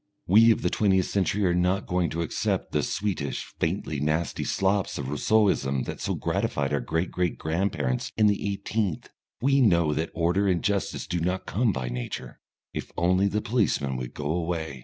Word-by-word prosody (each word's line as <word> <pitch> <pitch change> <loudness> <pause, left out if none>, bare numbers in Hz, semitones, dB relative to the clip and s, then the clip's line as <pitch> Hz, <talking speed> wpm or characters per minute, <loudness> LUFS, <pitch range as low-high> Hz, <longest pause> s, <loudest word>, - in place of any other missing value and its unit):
We 110 +5 +6
of 115 - +3
the - - +1
twentieth 95 -3 +3
century 100 +1 0
are 90 - +3
not 90 +3 +1
going 90 -3 0
to 85 +1 -2
accept 80 - -2
the - - +1
sweetish, 95 -9 -2
faintly 80 -3 -1
nasty 75 +2 -1
slops 95 0 0
of 70 -2 -4
Rousseauism 75 - +2
that - - -6
so - - -1
gratified 70 0 -1
our 70 - +2
great 80 +3 -2
great 90 -2 -1
grandparents 80 -6 -1
in 110 - +4
the 100 -1 +2
eighteenth. 100 -3 -2 0.3
We 135 +1 +4
know 85 -9 +4
that 80 +2 -1
order 85 +4 +2
and 90 -3 +1
justice 100 -1 -1
do 90 - -2
not 90 +3 -1
come 115 +1 +1
by 65 -7 -3
Nature - - -6 0.3
"if - - -5
only 90 +3 +3
the 105 +1 -1
policeman 100 - 0
would 60 -1 -6
go 75 - -6
away." 80 -4 -2
90 Hz, 180 wpm, -26 LUFS, 75-100 Hz, 0.3 s, We